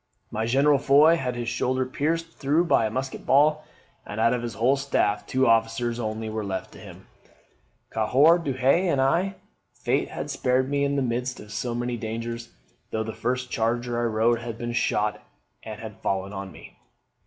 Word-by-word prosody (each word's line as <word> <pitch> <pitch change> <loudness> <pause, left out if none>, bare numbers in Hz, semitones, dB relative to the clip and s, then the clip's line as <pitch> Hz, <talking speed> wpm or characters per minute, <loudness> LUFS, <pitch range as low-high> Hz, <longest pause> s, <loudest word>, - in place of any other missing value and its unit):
My 110 +1 -2
General, 140 +3 +4
Foy, 145 +4 +6
had 125 -6 -3
his 120 -1 -4
shoulder 130 +2 0
pierced 165 +5 -2
through 155 +3 +1
by 115 -9 +3
a - - -4
musket 130 +4 -4
ball: 150 +2 +3 0.4
and 105 - -7
out 115 +1 +4
of 125 - -1
his 120 -1 -5
whole 125 +4 +3
staff 120 -7 0
two 130 0 +2
officers 115 +1 +1
only 110 -1 -3
were 110 0 -3
left 95 -2 -4
to - - -13
him, - - -12 0.9
Cahour 135 +10 +4
Duhay 140 +4 +2
and 140 - +1
I. 175 +9 +2 0.4
Fate - - 0
had - - -5
spared 130 +2 +1
me 140 0 +1
in 140 0 +1
the 140 - +1
midst 125 +1 -2
of 105 - -12
so 120 -2 -3
many 120 0 -2
dangers, 115 +1 -5 0.4
though 110 - -2
the 110 0 -5
first 125 +4 -2
charger 120 +1 -1
I - - 0
rode 115 +1 +2
had 115 -1 -6
been 120 0 -4
shot 105 -3 0 0.4
and 110 -1 -8
had 110 -2 -9
fallen 95 +1 -2
on 95 -1 -6
me. - - -14
120 Hz, 190 wpm, -25 LUFS, 115-135 Hz, 0.9 s, Foy